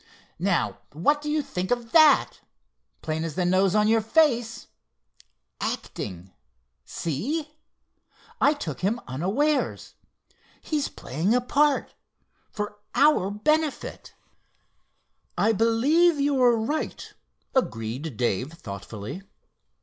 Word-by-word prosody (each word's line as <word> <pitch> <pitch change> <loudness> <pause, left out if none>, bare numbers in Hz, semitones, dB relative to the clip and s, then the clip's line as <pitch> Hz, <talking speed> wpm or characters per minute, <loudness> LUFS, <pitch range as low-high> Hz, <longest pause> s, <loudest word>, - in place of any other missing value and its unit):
"Now - - 0
what 290 - +2
do 300 - -4
you 300 0 0
think 180 -7 -4
of 240 -2 -2
that? 315 -2 +5 0.6
Plain 160 0 -2
as 165 -3 -4
the 180 - 0
nose 185 +2 +3
on 210 0 +4
your 225 0 +3
face. 235 -3 +1 0.9
'Acting,' 95 -1 -5 0.5
see? 285 - -3 0.9
I 290 +2 +4
took 160 - -5
him 205 +6 0
unawares. 195 - -1 0.7
He's 300 -3 -2
playing 165 - -1
a - - +4
part—for 250 -6 -2 0.2
our 290 -10 +4
benefit!" 305 +9 -1 1.2
"I 220 - +3
believe 275 - +3
you're 260 -4 +3
right," 260 +8 -3 0.4
agreed 125 - -2
Dave 125 - -1
thoughtfully. 105 - -8
225 Hz, 100 wpm, -25 LUFS, -, 1.2 s, that